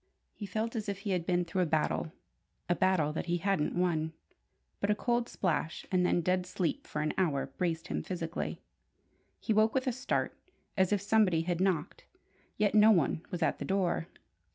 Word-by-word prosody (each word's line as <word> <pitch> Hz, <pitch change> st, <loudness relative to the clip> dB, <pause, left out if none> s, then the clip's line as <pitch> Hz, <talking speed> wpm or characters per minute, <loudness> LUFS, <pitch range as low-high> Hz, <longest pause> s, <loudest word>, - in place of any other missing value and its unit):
He 205 Hz, -, -7 dB
felt 220 Hz, +5 st, -2 dB
as 215 Hz, -2 st, -3 dB
if 200 Hz, -1 st, -4 dB
he 205 Hz, -, -2 dB
had 180 Hz, -3 st, -1 dB
been 175 Hz, -1 st, +2 dB
through 185 Hz, +2 st, -1 dB
a 175 Hz, -, +2 dB
battle 155 Hz, +1 st, 0 dB, 0.6 s
a 175 Hz, -, +3 dB
battle 175 Hz, -5 st, +2 dB
that 160 Hz, -, -4 dB
he 175 Hz, 0 st, +1 dB
hadn't 190 Hz, -4 st, 0 dB
won. 160 Hz, -3 st, +1 dB, 0.7 s
But 200 Hz, -, -1 dB
a 210 Hz, -, +4 dB
cold 240 Hz, +2 st, 0 dB
splash, 165 Hz, -3 st, -1 dB
and 180 Hz, -1 st, +3 dB
then 175 Hz, -1 st, +2 dB
dead 180 Hz, +1 st, 0 dB
sleep 180 Hz, -2 st, -2 dB
for 150 Hz, -, -2 dB
an 155 Hz, -, -1 dB
hour, 140 Hz, -7 st, +1 dB
braced 165 Hz, +4 st, -3 dB
him -, -, -1 dB
physically. 170 Hz, -2 st, -4 dB, 0.8 s
He 220 Hz, -, 0 dB
woke 215 Hz, +3 st, +3 dB
with 260 Hz, 0 st, +1 dB
a 255 Hz, -, +2 dB
start, 260 Hz, +3 st, -1 dB, 0.4 s
as 190 Hz, 0 st, +2 dB
if 205 Hz, -2 st, +2 dB
somebody 200 Hz, -6 st, +3 dB
had 175 Hz, +1 st, -1 dB
knocked; 185 Hz, -3 st, -1 dB, 0.5 s
yet 210 Hz, -1 st, +2 dB
no 215 Hz, 0 st, +7 dB
one 170 Hz, -6 st, +3 dB
was 175 Hz, -2 st, -2 dB
at -, -, +1 dB
the -, -, -3 dB
door. 185 Hz, -4 st, 0 dB
180 Hz, 195 wpm, -31 LUFS, 165-205 Hz, 0.8 s, no